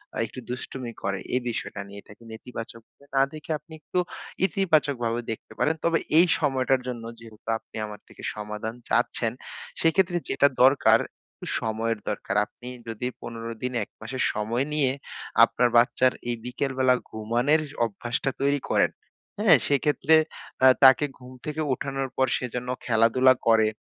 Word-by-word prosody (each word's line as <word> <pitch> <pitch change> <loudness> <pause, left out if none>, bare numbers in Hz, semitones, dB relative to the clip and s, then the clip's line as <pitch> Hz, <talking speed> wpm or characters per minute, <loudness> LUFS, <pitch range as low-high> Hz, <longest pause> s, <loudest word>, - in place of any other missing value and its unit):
আ - - -4
একটু 120 - -9
দুষ্টুমি 125 0 -5
করে। 100 -1 -1 0.2
এ - - +4
বিষয়টা 110 -3 -4
নিয়ে 100 0 -10
এটাকে 105 +4 -17
নেতিবাচকভাবে 115 +2 -10
না 135 - +5
দেখে 155 +1 -7
আপনি 160 - -16
একটু 180 - -2 0.5
ইতিবাচকভাবে 145 - +1
দেখতে 110 - -8
পারেন। 155 +2 +2
তবে 165 -1 +3 0.2
এই 170 - +8
সময়টা 135 -3 +2
জন্য 120 -2 -4 0.2
যেহেতু 115 -1 -12
আপনি - - -20
আমার 105 -1 -9
থেকে - - -15
সমাধান 105 +2 -5
চাচ্ছেন, - - +1 0.5
সেক্ষেত্রে 175 +2 +3
যেটা 140 - +4 0.2
দরকার; 135 +1 +5 0.4
একটু - - -2
সময়ের 110 0 -1
দরকার। 100 -1 -3
আপনি 120 +3 -14 0.2
যদি 115 +2 -3
১৫ 115 0 -6
দিন, 125 0 -2
১ - - -12
মাসের 120 +4 -3
সময় 115 +5 -1
নিয়ে 140 -4 +3 0.5
আপনার 125 0 +3
বাচ্চার 125 +1 +4 0.2
এই 120 - 0
বিকেলবেলা 130 0 +1 0.2
ঘুমানের 120 +8 +1 0.2
অভ্যাসটা 120 +4 -2
তৈরি 140 +1 +2
করেন, - - +3 0.5
হ্যাঁ? 210 -6 +7
সেক্ষেত্রে 145 +2 +3 0.5
আ - - +10 0.2
তাকে 130 +2 +8
ঘুম 125 0 -12
থেকে 155 +1 -3
উঠানোর 135 +1 -3
পর 130 - +3
সে - - -3
যেন 125 0 -3 0.2
খেলাধুলা 115 +3 +5
করে। 110 -1 +5
125 Hz, 150 wpm, -26 LUFS, 115-140 Hz, 0.5 s, আ